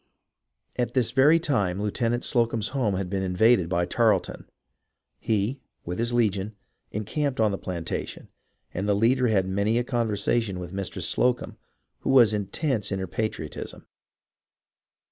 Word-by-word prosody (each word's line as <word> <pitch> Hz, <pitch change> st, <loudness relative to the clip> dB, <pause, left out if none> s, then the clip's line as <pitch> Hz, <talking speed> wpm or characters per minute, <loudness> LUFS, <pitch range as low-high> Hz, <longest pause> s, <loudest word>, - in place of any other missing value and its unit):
At 125 Hz, +1 st, -1 dB
this 120 Hz, -3 st, +2 dB
very 140 Hz, +5 st, +5 dB
time 100 Hz, -, 0 dB
Lieutenant 115 Hz, +3 st, -1 dB
Slocumb's 115 Hz, -3 st, +1 dB
home 120 Hz, -8 st, 0 dB
had 95 Hz, 0 st, -2 dB
been 95 Hz, +1 st, -2 dB
invaded 95 Hz, 0 st, +3 dB
by 90 Hz, -1 st, +1 dB
Tarleton. 110 Hz, -3 st, 0 dB, 0.7 s
He, 110 Hz, +5 st, -1 dB, 0.3 s
with 90 Hz, +4 st, -4 dB
his 120 Hz, +1 st, 0 dB
legion, 105 Hz, -3 st, 0 dB, 0.4 s
encamped 130 Hz, +6 st, -2 dB
on 110 Hz, -2 st, +3 dB
the 100 Hz, -, -3 dB
plantation, 85 Hz, -3 st, -5 dB, 0.5 s
and 95 Hz, +3 st, -2 dB
the 100 Hz, -, +3 dB
leader 125 Hz, +4 st, +3 dB
had 100 Hz, -4 st, +2 dB
many 100 Hz, +4 st, 0 dB
a 120 Hz, -, +1 dB
conversation 115 Hz, -4 st, -1 dB
with 90 Hz, 0 st, -7 dB
Mistress 95 Hz, -2 st, -3 dB
Slocumb, 125 Hz, +6 st, 0 dB, 0.4 s
who -, -, -4 dB
was 120 Hz, -5 st, +6 dB
intense 105 Hz, +3 st, -1 dB
in 95 Hz, -, 0 dB
her 95 Hz, -, -3 dB
patriotism. 95 Hz, -5 st, -5 dB
110 Hz, 145 wpm, -26 LUFS, 95-120 Hz, 0.7 s, was